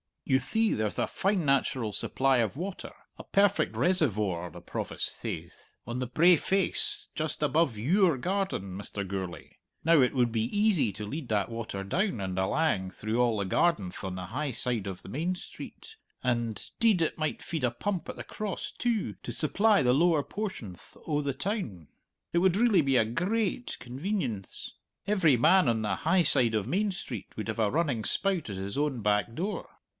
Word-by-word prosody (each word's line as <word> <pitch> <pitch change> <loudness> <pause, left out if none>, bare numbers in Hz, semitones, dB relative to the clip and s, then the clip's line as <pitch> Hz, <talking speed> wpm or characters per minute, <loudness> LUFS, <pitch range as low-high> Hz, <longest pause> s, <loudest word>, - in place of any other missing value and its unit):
"You 130 - +3
thee, 220 +7 +1
there'th 105 -4 -1
a - - +1
fine 195 -4 0
natural 135 -4 +1
supply 135 +5 +1
of 115 -1 0
water 185 +5 -5 0.3
a - - -7
perfect 200 0 +2
reservore 105 - +1
the - - -11
Provost - - -2
sayth - - -7
on 120 +2 -4
the 125 - -2
brae 170 +8 +5
face 415 - 0
just 155 -1 -3
above 150 -5 +2
your 165 - +3
garden, 180 - -2
Mr. 100 0 -5
Gourlay. 95 -2 -6 0.3
Now, 165 -2 +5
it 125 +2 +2
would 120 -2 +2
be 110 -1 0
easy 200 - +3
to 105 +1 -6
lead 140 +5 -5
that 105 -1 +1
water 115 -4 -5
down 175 - 0
and 95 -1 -3
alang 95 -2 +1
through 110 +3 -2
all 120 -3 +2
the 100 - -1
gardenth 100 - +1
on 95 -1 -4
the 90 -1 -5
high 145 +8 -2
side 120 -4 -1
of 95 -2 -7
Main 170 +6 -1
Street 440 - -10 0.3
and, 120 -4 -1
'deed, 220 -6 +4
it 160 - 0
might 155 -1 -2
feed 160 -6 -2
a - - +3
pump 180 +10 -3
at - - -5
the - - -6
Cross, 210 -4 -4
too, 235 -4 0
to - - -5
supply 200 +3 +3
the 125 0 +4
lower 160 +1 +3
portionth 185 - -6
o' 150 -2 0
the 140 -1 -1
town. 130 - -4 0.4
It - - 0
would 185 +1 +3
really 225 -5 +5
be 135 -2 +1
a 115 - +4
grai 185 - 0
ait 245 - -7
convenience. 130 - -4 0.3
Every 190 -9 +4
man 180 +10 +5
on 115 -2 +2
the 105 -3 -1
high 175 +3 +3
side 125 -7 +5
o' 105 - +1
Main 195 - 0
Street 125 - -7
would 110 +1 -5
have 110 - -3
a 110 -2 +3
running 140 -7 0
spout 190 - 0
at 100 - -4
his 95 +4 -5
own 145 -5 0
back 105 +2 +1
door! 190 +2 -3
135 Hz, 190 wpm, -29 LUFS, -, 0.4 s, brae